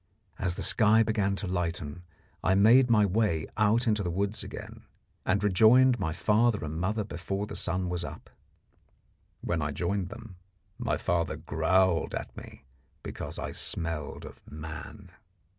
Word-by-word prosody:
As 90 -2 -1
the - - -5
sky 110 0 +5
began 105 -3 0
to 100 - -3
lighten, 90 -3 -3 0.4
I 95 - +3
made 120 +6 +6
my 105 -3 +5
way 95 -5 0
out 110 +3 +2
into 105 -3 +1
the 90 - -2
woods 100 +4 -2
again, - - -9 0.4
and 100 +2 +1
rejoined 115 +6 +5
my 80 -4 -1
father 105 +3 +1
and 80 +1 -5
mother 105 +4 -1
before 95 +1 -4
the - - -8
sun 90 +1 +2
was 90 -1 -2
up. - - -9 1.1
When 85 -2 -1
I 75 - -1
joined 90 +5 -2
them, 105 -2 -11 0.4
my - - -1
father 85 -2 -1
growled 85 +2 +1
at - - -6
me - - -12 0.4
because - - -6
I - - -4
smelled 80 -3 -3
of - - -12
man. 75 0 -9
95 Hz, 155 wpm, -28 LUFS, 85-105 Hz, 1.1 s, made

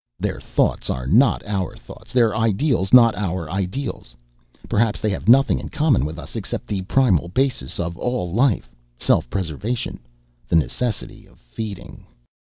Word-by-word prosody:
"Their - - -2
thoughts - - 0
are 65 - -2
not 115 - +3
our 100 -4 -2
thoughts, - - -14
their 115 -4 +3
ideals 110 -1 +1
not 115 -3 +8
our 95 -4 -3
ideals. 95 - -4 0.5
Perhaps 110 0 +1
they 105 - 0
have 95 - -2
nothing 135 +3 +5
in - - -7
common 150 - +2
with 80 +2 -5
us 85 - -10
except - - -4
the 100 -2 -3
primal 95 - +2
basis 125 - -1
of 85 0 -3
all 120 -9 -2
life, 120 0 +1 0.2
self - - +1
preservation, 100 - -3 0.5
the - - 0
necessity 90 - -1
of - - -23
feeding. 90 - -8
105 Hz, 155 wpm, -21 LUFS, 85-125 Hz, 0.5 s, not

